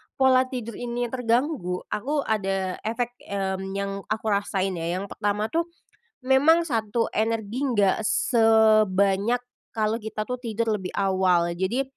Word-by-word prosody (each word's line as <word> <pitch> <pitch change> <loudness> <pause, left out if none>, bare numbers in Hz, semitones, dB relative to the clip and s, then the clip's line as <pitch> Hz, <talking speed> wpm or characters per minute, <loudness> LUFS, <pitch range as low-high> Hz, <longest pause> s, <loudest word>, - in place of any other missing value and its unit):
pola 260 -1 +4
tidur 235 -4 -6
ini 240 0 -3
terganggu, 240 - -1
aku 280 +7 -1
ada 195 -3 -1
efek, 230 +2 -2
mmm, 190 -1 -3
yang 200 0 -2 0.2
aku 215 +1 -3
rasain 195 -1 0
ya. 170 +2 -2
Yang 200 - -7
pertama 210 +1 -1
tuh, 335 +1 0 0.6
memang 280 +6 +4
satu, 230 -6 -1
energi 220 +1 -1
enggak 205 -7 +2
sebanyak 220 -2 +3 0.3
kalau 220 0 0
kita 215 -1 -5
tuh 250 +3 -4
tidur 230 -2 -1
lebih 185 -1 -7
awal. 185 -3 +2
Jadi, 225 +9 0
220 Hz, 135 wpm, -25 LUFS, 195-245 Hz, 0.6 s, pola